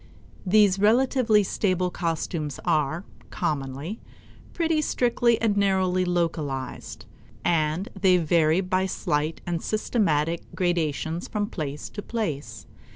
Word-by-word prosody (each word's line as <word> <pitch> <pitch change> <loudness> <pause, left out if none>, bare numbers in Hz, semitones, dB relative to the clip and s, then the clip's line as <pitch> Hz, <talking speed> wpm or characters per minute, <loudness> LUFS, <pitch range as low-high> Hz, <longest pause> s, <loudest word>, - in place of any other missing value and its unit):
These 200 -1 +4
relatively 225 0 +4
stable 185 -2 0
costumes 165 -4 -3
are, 155 +3 +1 0.3
commonly, 145 - -3 0.5
pretty 325 -2 +1
strictly 240 -4 +2
and 220 -3 +1
narrowly 190 -2 +2
localized, 155 -7 -3 0.4
and 160 +2 +1
they 190 -2 +4
vary 165 0 +3
by 185 0 0
slight 155 -3 -1
and 170 -2 -2
systematic 170 -8 0
gradations 165 -2 -1
from 210 -1 -1
place 150 -3 -4
to 205 - -6
place. 200 -12 -4
180 Hz, 105 wpm, -25 LUFS, 155-205 Hz, 0.5 s, These